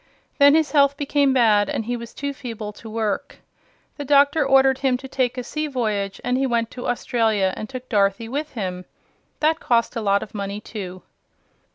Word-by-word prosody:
Then 285 +1 +7
his 315 -3 +2
health 280 -1 +4
became 285 -1 +2
bad 220 -5 +3
and 225 - -2
he 245 +2 -2
was 235 -1 -8
too 280 0 -4
feeble 225 -5 -7
to 225 - -11
work. 220 +4 -3 0.6
The 290 - -4
doctor 285 +2 +4
ordered 270 0 +4
him 265 -2 +1
to 265 - -9
take 255 -1 -1
a 250 - -3
sea 305 +5 -3
voyage 215 -7 -2
and 250 +1 0
he 270 - +1
went 230 -2 0
to 245 - -6
Australia 220 -5 +1
and 215 - -6
took 255 -1 -8
Dorothy 200 +1 +1
with 290 +6 -4
him. 185 -5 -4 0.6
That 315 +2 +2
cost 235 0 +1
a 230 - -2
lot 200 -1 +2
of - - -12
money, 200 0 -4
too. 185 -4 -8
245 Hz, 195 wpm, -22 LUFS, 210-275 Hz, 0.6 s, Then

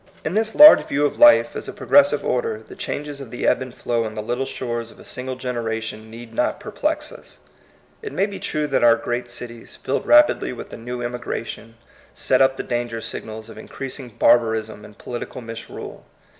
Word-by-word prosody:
In 155 - -1
this 220 +1 0
large 300 +1 +10
view 145 +1 +1
of 145 - -2
life 300 0 +7
as - - -5
a - - -6
progres 285 0 +5
sive - - -3
order, 455 -2 -1
the - - -11
changes 145 -1 -5
of 135 - -9
the 120 - -4
ebb - - +3
and 130 -1 -6
flow 120 -1 -2
on 110 -1 -6
the 105 - -4
little 120 +4 -2
shores 120 -3 -4
of - - -17
a - - -14
single 130 0 -5
generation 115 -3 -4
need 115 0 -11
not 125 +10 0
perplex 300 +9 -2
us. - - -12 0.6
It 430 - -6
may 195 - +1
be 200 -1 -7
true 150 0 -1
that 145 - 0
our 115 -1 +7
great 120 +1 -4
cities, 120 -1 -9
filled 135 - -2
rapidly 300 - +5
with - - -9
a - - -6
new 120 +1 -6
emigration, 115 -1 -5 0.4
set 130 0 +2
up 135 0 +4
the - - -3
danger 120 -1 -3
signals 110 0 -7
of 110 - -11
increasing 135 -1 -7
barbarism 110 -2 +2
and 105 -1 -15
political 120 +1 -6
misrule. 115 -1 -9
120 Hz, 200 wpm, -22 LUFS, 115-145 Hz, 0.6 s, large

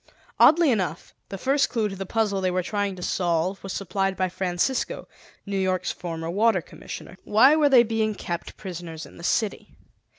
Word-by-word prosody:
Oddly 320 -2 +6
enough, 180 -8 -2 0.2
the 195 - -5
first 275 +7 +2
clue 225 -3 0
to 195 - -6
the 195 0 -6
puzzle 210 -3 0
they 185 - +1
were 180 0 0
trying 205 0 -2
to 180 - -8
solve 175 +2 0
was 195 - -6
supplied 195 0 -1
by 185 0 0
Francisco, 180 +8 -1 0.4
New 200 -1 -2
York's 185 -1 0
former 165 -2 -5
Water 215 +1 +3
Commissioner. - - -10
Why 260 +8 +5
were 300 -2 +4
they 255 -3 +7
being 220 -2 -1
kept 170 -3 -5
prisoners 170 -4 -7
in - - -15
the 170 - -11
city? 210 +3 -1
195 Hz, 185 wpm, -25 LUFS, 180-220 Hz, 0.4 s, they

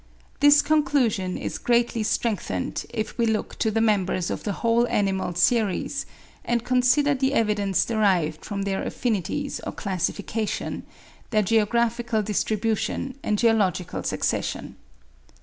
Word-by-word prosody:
This 290 +1 +6
conclusion 270 -11 +1
is - - -4
greatly 235 -1 +1
strengthened, 215 0 -2
if 220 -2 -3
we 230 - +3
look 220 -1 -2
to 220 - +2
the 225 +1 0
members 190 -5 +1
of - - -3
the 205 - -2
whole 235 +1 +3
animal 190 -5 0
series, 225 +7 +1 0.4
and 235 -1 0
consider 255 +3 +3
the 270 +1 0
evidence 205 -3 +1
derived 185 -9 +1
from 200 -1 -4
their 195 -1 -1
affinities 245 - -2
or - - -5
classification, 200 +3 -3 0.4
their 215 -2 +2
geographical 230 +2 +1
distribution 220 +5 -1
and 210 - 0
geological 205 -6 +1
succession. - - -2
220 Hz, 125 wpm, -24 LUFS, 200-240 Hz, 0.4 s, This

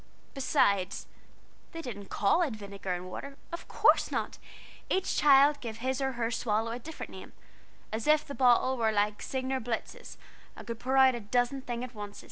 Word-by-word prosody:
Beside, 200 -9 +2 0.8
they 330 - -5
didn't 205 -7 -7
call 205 - +2
it 290 -10 0
vinegar 200 -2 -6
and 180 +1 -7
water 275 +6 -7
of 340 - -7
course - - +4
not! - - -3 0.5
Each 380 0 0
child 285 0 +6
gave 225 -3 -6
his 260 +3 -2
or 265 0 0
her 235 -1 -2
swallow 225 -1 0
a 240 - -4
different 320 +6 -8
name, - - -11 0.6
as 220 +3 -3
if 305 0 +4
the 285 - -7
bottle 255 0 +3
were 225 -2 +2
like 210 0 0
Signor 260 0 -2
Blitz's 225 -1 -5 0.4
and - - -10
could 230 -1 -5
pour 260 +2 0
out 265 -1 +7
a 240 - -4
dozen 245 +5 0
things 240 -1 -4
at 255 -1 -7
once. 205 -2 -8
245 Hz, 185 wpm, -30 LUFS, 215-270 Hz, 0.8 s, out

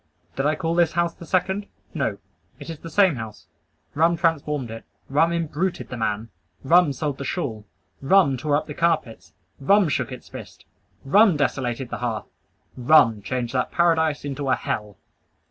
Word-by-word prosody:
Did 135 +2 0
I 155 - +1
call 165 +1 -2
this 170 -1 +2
house 170 0 0
the 170 - -13
second? 190 +2 0 0.3
No; - - -1 0.4
it - - -8
is 160 - -8
the 165 - -9
same 185 -3 +3
house. 110 -2 -8 0.5
Rum 165 +3 +2
transformed 150 -6 -1
it. 115 - -8 0.3
Rum 155 +5 +3
imbruted 170 +2 -2
the - - -5
man. 110 0 -2 0.3
Rum 165 +2 +5
sold 140 0 -3
the - - -4
shawl. 120 - -4 0.3
Rum 140 -1 +4
tore 145 +3 0
up 150 - 0
the 150 - -7
carpets. 160 -8 -1 0.3
Rum 195 +5 +4
shook 140 - -1
its 125 - -9
fist. - - -11 0.4
Rum 195 +4 +5
desolated 130 -3 -2
the - - -4
hearth. 120 -3 -3 0.5
Rum 125 -5 +4
changed 120 +4 -3
that 125 -1 -1
paradise 160 -4 +2
into 140 -1 -3
a - - +4
hell! 105 -2 -4
145 Hz, 170 wpm, -23 LUFS, 125-170 Hz, 0.5 s, Rum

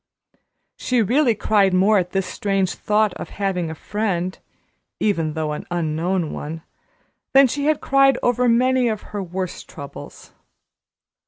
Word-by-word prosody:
She 250 -3 +1
really 245 +2 +2
cried 200 -3 +2
more 200 +3 +4
at 180 -1 -2
this 195 0 -1
strange 195 -2 -1
thought 210 -1 +1
of - - -7
having 190 -4 -2
a 160 - -6
friend 185 -1 -2 0.6
even 165 -7 0
though 155 -1 -2
an 150 - -6
unknown 170 +1 -1
one 160 +2 -6 0.7
than 275 +1 +8
she 280 +3 -2
had 305 -1 +1
cried 275 -1 +4
over 245 0 +2
many 255 +1 +3
of 215 -2 -2
her 205 - -2
worst 185 0 -5
troubles. 140 - -10
195 Hz, 145 wpm, -21 LUFS, 175-235 Hz, 0.7 s, than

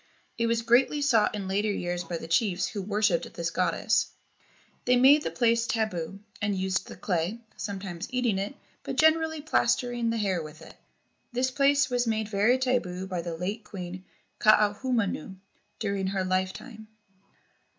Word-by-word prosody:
It 230 0 0
was 230 0 +1
greatly 250 +5 +3
sought 245 -8 +3
in 200 -2 -4
later 205 +2 0
years 175 -2 -2
by 170 0 -4
the 160 - -8
chiefs 180 +1 +1
who 205 - -4
worshipped 205 -2 0
this 170 -1 -2
goddess. 185 - +1 0.8
They 250 - +4
made 270 +4 +6
the - - -2
place 235 -1 +2
tabu, 195 -7 -2 0.2
and 205 -1 0
used 190 0 -1
the - - -9
clay, 180 +5 -2
sometimes 190 -4 -5
eating 245 -6 +1
it, 200 +7 -4 0.3
but - - -5
generally 315 0 +3
plastering 245 -5 +1
the 230 - 0
hair 195 -5 0
with 155 -1 -10
it. - - -12 0.6
This 255 +1 +1
place 280 0 +3
was 245 -1 +1
made 220 -1 -1
very 215 +5 +3
tabu 240 -9 -1
by 185 -2 -3
the 170 -1 -5
late 200 +6 -3
Queen 185 -2 -7 0.4
Kaahumanu 210 -3 +2 0.4
during 200 -3 -2
her 190 0 -1
lifetime. 190 +5 -3
210 Hz, 160 wpm, -27 LUFS, 185-240 Hz, 0.8 s, made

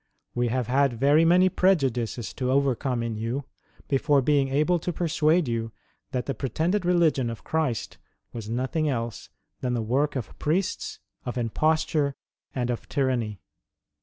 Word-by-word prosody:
We 120 0 +1
have 125 +1 0
had 130 -1 +2
very 145 +4 +5
many 180 +2 +6
prejudices 130 - +1
to 130 -2 -2
overcome 130 -2 +1
in 115 -1 -3
you, 115 +6 -2 0.4
before 140 0 +3
being 140 0 +3
able 150 +6 +2
to 175 - -2
persuade 165 -1 +2
you, 115 -1 -2 0.4
that 125 -2 -2
the 135 - -1
pretended 165 - -1
religion 165 -8 +3
of 115 - -7
Christ 155 -8 -2 0.3
was 110 -2 -6
nothing 130 +6 0
else 115 -4 -3 0.3
than 125 -1 -1
the 120 - 0
work 140 +7 +1
of 130 -5 -5
priests, 170 +5 -1 0.3
of 125 +1 -4
imposture, 145 +4 +1 0.4
and 125 -2 0
of 120 - -5
tyranny. 125 -8 -1
135 Hz, 150 wpm, -26 LUFS, 120-155 Hz, 0.4 s, many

